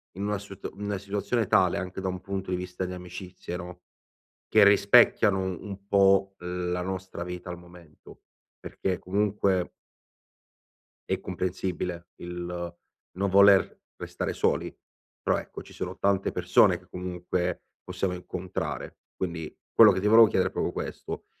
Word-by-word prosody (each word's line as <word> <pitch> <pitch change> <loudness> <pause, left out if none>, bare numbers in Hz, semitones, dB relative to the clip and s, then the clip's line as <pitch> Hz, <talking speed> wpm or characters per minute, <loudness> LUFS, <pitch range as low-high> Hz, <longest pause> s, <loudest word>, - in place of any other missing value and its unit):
in 100 - -4
una 105 0 0
sut 100 -1 -8
in 100 - -8
una 100 -1 -1
situazione 100 +3 -1
tale 90 -1 +3
anche 95 +1 -5
da 95 - -1
un 90 0 -5
punto 95 -1 -4
di 90 - 0
vista 90 +1 -4
di 90 - -5
amicizie, 90 0 -8
no, 90 0 -9 0.7
che - - +6
rispecchiano 100 0 +5
u 95 -2 -3
un 100 -1 -8
po' 95 -1 +4
la 90 0 -3
nostra 95 -1 -5
vita 90 0 -7
al 90 - -6
momento. 85 -3 -16 0.4
Perché 95 -2 -3
comunque 95 -1 0 1.4
è 95 - 0
comprensibile 90 -1 -3
il 85 0 -5 0.4
non 100 +2 0
voler 100 0 +5 0.2
restare - - -4
soli. - - 0 0.5
Però - - +1
ecco, - - -8
ci - - -14
sono - - -5
tante 100 0 +1
persone 90 0 +4
che 90 - -23
comunque 90 0 -3 0.2
possiamo 95 -2 -2
incontrare. 90 0 -5 0.2
Quindi 85 -4 -4 0.2
quello 110 -2 +9
che 95 - -1
ti 105 - 0
volevo 110 +1 +8
chiedere - - +1
è - - -22
proprio - - -1
questo, - - -6
95 Hz, 150 wpm, -27 LUFS, 90-100 Hz, 1.4 s, quello